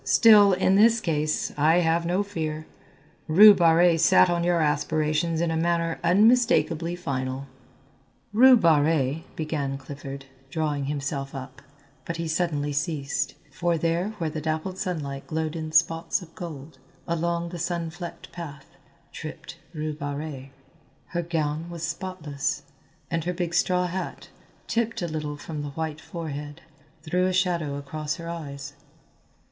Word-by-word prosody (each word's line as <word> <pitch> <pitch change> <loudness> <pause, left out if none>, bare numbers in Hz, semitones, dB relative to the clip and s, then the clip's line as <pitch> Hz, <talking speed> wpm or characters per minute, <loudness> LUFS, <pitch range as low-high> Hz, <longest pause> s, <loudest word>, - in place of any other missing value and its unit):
Still, 200 +9 +7
in 190 +1 +3
this 230 +2 +5
case, 155 -5 -1
I 155 +3 +4
have 170 0 +1
no 185 +4 +1
fear. 155 -6 -4 0.6
Rue 205 +7 +9
Barrée 170 -1 +4
sat 185 +1 +5
on 170 0 0
your 175 0 +2
aspirations 155 +2 +1
in 170 -1 +1
a - - -1
manner 165 0 0
unmistakably 180 -4 +3
final." 135 -5 -3 0.9
"Rue 255 +3 +8
Barrée," 155 - +2
began 145 -3 -2
Clifford, 140 0 -8 0.2
drawing 150 -2 -1
himself 140 -1 -3
up, 135 +1 -8 0.4
but 165 +3 -4
he 165 0 -3
suddenly 155 -3 -1
ceased, 140 -1 -2 0.2
for 170 +5 0
there 170 +6 -1
where 165 -5 -2
the 155 0 -4
dappled 160 +5 -3
sunlight 145 -7 -4
glowed 160 0 -2
in 155 -1 -4
spots 165 +4 +2
of 165 -1 -15
gold, 150 -5 -8 0.3
along 170 +1 -1
the 175 0 -7
sun 170 -1 -2
flecked 175 0 -9
path, 145 -5 -8 0.5
tripped - - -8
Rue 155 -2 -3
Barrée. 145 -2 -5 0.6
Her 175 - -1
gown 160 -1 -2
was 170 -1 -7
spotless, 165 -4 -3 0.5
and 165 -1 -1
her 180 - -1
big 175 -1 -3
straw 180 +1 +2
hat, 185 +1 -5 0.4
tipped 230 -4 -1
a - - -1
little 150 -2 -4
from 150 +1 -6
the 145 - -4
white 160 -1 -3
forehead, 150 -2 -6 0.4
threw 180 +3 +1
a - - +1
shadow 175 -6 0
across 150 +2 -4
her 170 -1 -8
eyes. 145 -4 -6
160 Hz, 145 wpm, -26 LUFS, 145-175 Hz, 0.9 s, Rue